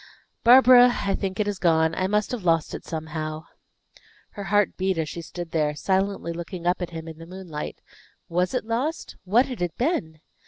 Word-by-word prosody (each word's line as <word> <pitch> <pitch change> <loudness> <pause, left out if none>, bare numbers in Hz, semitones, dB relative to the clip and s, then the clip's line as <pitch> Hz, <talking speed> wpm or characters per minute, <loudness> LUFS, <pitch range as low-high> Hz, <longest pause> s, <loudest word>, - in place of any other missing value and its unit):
"Barbara, 250 0 +8
I 200 - 0
think 195 0 -3
it 210 - +1
is 205 -2 -3
gone. 160 -2 +3
I 185 +3 0
must 210 +1 0
have 245 -6 -4
lost 165 -3 +1
it - - -6
somehow." 155 0 -5 0.9
Her 200 - -7
heart 205 +1 +2
beat 190 -1 -1
as 160 -1 -1
she 170 - -6
stood 170 +1 -7
there, 150 -2 0
silently 190 0 -1
looking 170 +1 -7
up 180 +1 +1
at 180 - -3
him 165 -1 -8
in 160 0 -9
the 165 - -10
moonlight. 180 -4 -7 0.5
Was 180 +7 0
it 250 - -1
lost? 255 +8 -3
What 225 +8 +4
had 250 -7 -7
it 175 -2 -2
been? 205 - -1
180 Hz, 195 wpm, -25 LUFS, 165-210 Hz, 0.9 s, Barbara